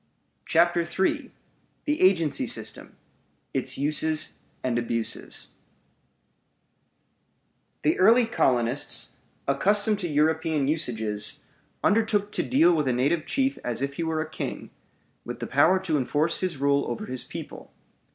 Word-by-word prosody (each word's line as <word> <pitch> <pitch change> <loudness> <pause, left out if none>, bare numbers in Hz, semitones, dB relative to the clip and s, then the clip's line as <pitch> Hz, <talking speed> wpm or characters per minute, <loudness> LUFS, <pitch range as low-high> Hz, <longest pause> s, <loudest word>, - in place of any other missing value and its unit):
CHAPTER 170 +1 +3
III 170 +3 -1 0.5
THE 295 0 0
AGENCY 170 -6 +3
SYSTEM: - - -4 0.6
ITS - - -2
USES 155 +2 0 0.3
AND 120 -2 0
ABUSES 115 -1 -4 2.3
The 155 - +2
early 230 +5 +6
colonists, 125 - +1 0.4
accustomed 205 +9 +3
to 180 - -2
European 155 -1 +1
usages, 110 -8 -1 0.4
undertook 210 -1 +2
to - - 0
deal 175 -10 +4
with 150 -4 +1
a 130 - +2
native 140 +6 +1
chief 270 0 0
as 120 +2 -2
if 140 0 -3
he 170 - -1
were 160 -1 -1
a 160 - -4
king, 155 - -6 0.5
with - - -7
the - - -3
power 185 +4 +4
to 165 -5 0
enforce 150 +5 0
his 185 -5 -2
rule 140 +1 +2
over 120 - -4
his 130 -1 -4
people. - - -9
155 Hz, 130 wpm, -26 LUFS, 135-185 Hz, 2.3 s, early